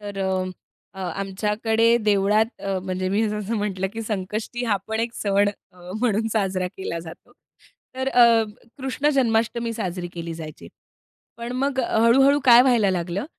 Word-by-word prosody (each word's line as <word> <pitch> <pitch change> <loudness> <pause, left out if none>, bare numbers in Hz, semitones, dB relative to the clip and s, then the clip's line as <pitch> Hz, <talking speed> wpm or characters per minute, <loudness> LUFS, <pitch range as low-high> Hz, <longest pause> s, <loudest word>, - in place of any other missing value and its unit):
तर 205 -1 -7
अ, 190 -1 0 0.5
अ, - - -6 0.2
आमच्याकडे 220 +4 +1
देवळात 210 +2 +2
अ, 195 -1 -2
म्हणजे 185 0 -3
मी 210 +3 +1
जसं 210 +1 -3
म्हटलं, 195 -2 -2
की 225 - -5
संकष्टी 215 +3 -4
हा 215 -4 +2
पण 220 0 -2
एक 230 0 -3
सण 200 0 +1 0.2
अ, 180 0 -13
म्हणून 225 -2 +1
साजरा 190 -4 0
केला 170 -3 -4
जातो. 165 0 -12 0.6
तर 260 +1 -2
अ, 235 -3 +5 0.3
कृष्ण 270 +2 -1
जन्माष्टमी 235 -2 +1
साजरी 180 -5 -4
केली 170 -1 -5
जायची. 155 - -9 0.7
पण 235 +1 -6
मग 270 +1 -1
हळू-हळू 255 +5 +4
काय 245 -1 +8
व्हायला 235 -6 +3
लागलं, 180 +4 -2
210 Hz, 150 wpm, -23 LUFS, 190-235 Hz, 0.7 s, काय